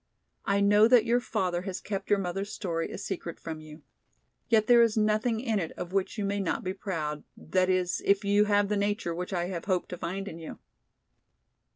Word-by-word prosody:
I 200 0 +2
know 205 +2 +6
that 235 -2 +5
your 240 +1 +3
father 180 -7 -1
has 190 0 -5
kept 195 -2 -5
your 205 - +4
mother's 195 +2 -3
story 165 -4 -3
a - - -6
secret 185 -4 -5
from 160 -1 -6
you. 155 0 -13 0.7
Yet 220 -2 +4
there 240 +1 +6
is 230 -1 +3
nothing 215 +2 +2
in 225 -4 0
it 165 -4 -4
of 180 +1 -7
which 195 +3 -1
you 205 - -1
may 200 +1 -1
not 190 -4 -1
be 185 - -2
proud, 160 -6 -4
that 185 +2 0
is, 185 -1 +1
if 200 +1 +2
you 205 +1 +4
have 205 -1 +3
the 210 - 0
nature 200 -4 -1
which 180 +3 -5
I 175 -2 -1
have 175 -3 -5
hoped 185 -3 0
to 180 - -6
find 195 +3 -4
in 165 -3 -7
you." 160 - -8
195 Hz, 215 wpm, -28 LUFS, 175-210 Hz, 0.7 s, know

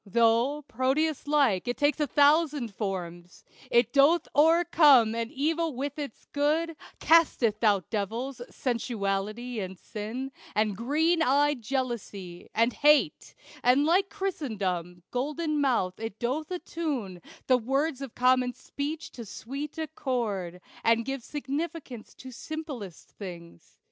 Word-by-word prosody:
Though, 235 +7 +2
Proteus 275 +4 0
like, 275 -11 +2
it 245 - -1
takes 290 0 +2
a 300 - +1
thousand 290 -5 +3
forms, 180 -3 -5 0.3
It 235 0 +3
doth 295 +4 +5
o'ercome 300 -7 +6
all 230 0 -1
evil 320 +2 0
with 280 +3 -4
its 285 -6 -7
good, 315 +3 +1 0.2
Casteth 260 -9 +3
out 200 -5 +2
devils 235 +5 -3
sensuality, 225 -1 -2
and 190 -1 -5
sin, 225 +8 -6 0.2
And 210 -1 +1
green 315 - +1
eyed 290 -1 +3
jealousy, 220 -8 -4
and 230 +2 +3
hate; 295 0 +3 0.3
and 255 +4 +4
like 375 +5 +3
Chrysostom, 195 - -3
golden 300 +4 -1
mouthed, 230 -10 +1
it 225 -2 -5
doth 270 +7 -2
attune 295 - -4 0.2
The 255 -1 +4
words 270 +4 -1
of 270 -4 -7
common 250 0 +3
speech 290 +5 -5
to 235 - -8
sweet 275 +8 -7
accord, 230 - -3 0.2
And 230 0 +3
gives 270 -2 -4
significance 290 -3 -5
to 260 - -10
simplest 270 - -7
things. 170 - -11
255 Hz, 125 wpm, -28 LUFS, 220-295 Hz, 0.3 s, o'ercome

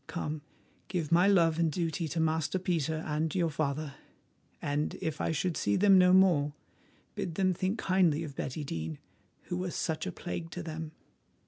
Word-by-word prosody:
Come, 155 -3 -4 0.5
give 170 -5 -2
my 175 +3 +5
love 170 -5 +4
and 165 -2 +2
duty 165 0 -1
to 160 +3 -3
Master 160 +2 +1
Peter 160 -3 -1
and 155 +1 -1
your 170 -3 +1
father, 150 -1 -2 0.7
and 145 +1 -1
if 160 -1 -3
I - - 0
should 165 +2 -1
see 100 - +1
them 195 -1 +6
no 180 0 +6
more, 175 -6 +4 0.6
bid 165 - -4
them 185 0 +2
think 185 +5 -1
kindly 180 -6 +2
of 145 -4 -7
Betty 135 +3 -4
Dene, 80 - -4 0.5
who 175 - -4
was 180 -1 -3
such 160 +3 -2
a - - -2
plague 170 -1 -5
to 175 +1 -6
them." 160 -1 -5
160 Hz, 180 wpm, -30 LUFS, 150-180 Hz, 0.7 s, them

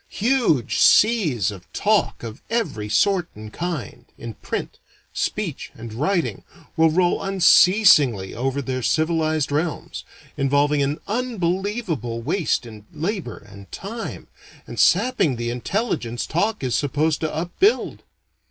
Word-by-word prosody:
Huge 225 - +1
seas 160 - +4
of 90 -4 -13
talk - - +1
of 115 -1 -8
every 215 - -2
sort 180 - +2
and 105 0 -10
kind, 170 - -5
in 115 -1 -7
print, - - -6 0.3
speech, - - -3
and 115 -1 -9
writing, 165 - -1 0.3
will 160 0 +4
roll 175 +2 +1
unceasingly 180 - +4
over 135 +3 -2
their 130 0 -3
civilized 155 0 0
realms, 155 +2 -3 0.3
involving 145 +1 +2
an 140 +3 -1
unbelievable 195 - -2
waste 150 +2 -1
in 110 -2 -12
labor 165 - -4
and 100 0 -15
time, 225 +4 -7 0.4
and - - -8
sapping 195 - +3
the 120 0 -3
intelligence 125 - -2
talk 205 +2 -1
is 125 -2 -1
supposed 150 +2 0
to 160 - -1
upbuild. 175 - 0
155 Hz, 125 wpm, -22 LUFS, 120-195 Hz, 0.4 s, seas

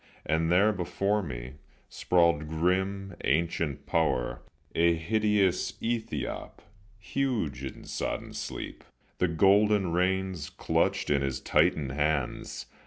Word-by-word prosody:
And 80 +2 +1
there, 100 +5 +5
before 100 +3 0
me, 65 -5 -7 0.3
sprawled 85 -4 +2
grim 95 +4 0
ancient 75 -1 0
Power, 65 -8 0 0.3
A 85 0 +4
hideous 100 +1 +1
ethiope, 110 - -4 0.4
huge 105 - -2
in 65 - -7
sodden - - -4
sleep, - - -6 0.4
The 90 - +3
golden 100 +2 +4
reins 95 -2 0
clutched - - 0
in 70 -1 +3
his 70 -1 -1
titan 75 -3 +2
hands. 75 -1 -1
85 Hz, 105 wpm, -29 LUFS, 75-100 Hz, 0.4 s, there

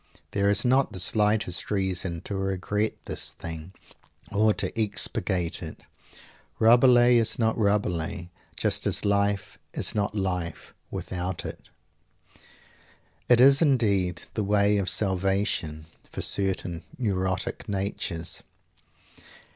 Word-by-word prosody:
There 100 0 +1
is 105 +3 +3
not 130 +2 +3
the 95 - -4
slightest 105 -1 +1
reason 95 -4 -1
to 100 - -5
regret 95 +2 -1
this - - -2
thing 80 +1 -7 0.6
or 105 +2 +3
to - - -3
expurgate 90 -4 0
it. - - -8 0.8
Rabelais 120 +1 +6
is 115 -1 +1
not 110 -1 +1
Rabelais, 100 -3 -1 0.3
just - - 0
as - - -1
life 100 0 0 0.2
is - - +1
not 105 0 -1
life, 90 -4 -3 0.2
without 90 0 -4
it. - - -8 1.6
It 120 -1 +6
is 135 +3 +7
indeed 100 - +2
the 110 - -1
way 100 0 +3
of 95 -2 0
"salvation" 95 -6 0 0.2
for - - -6
certain 90 -4 -2
neurotic 95 -7 -2
natures. 95 -4 -3
100 Hz, 115 wpm, -26 LUFS, 90-105 Hz, 1.6 s, is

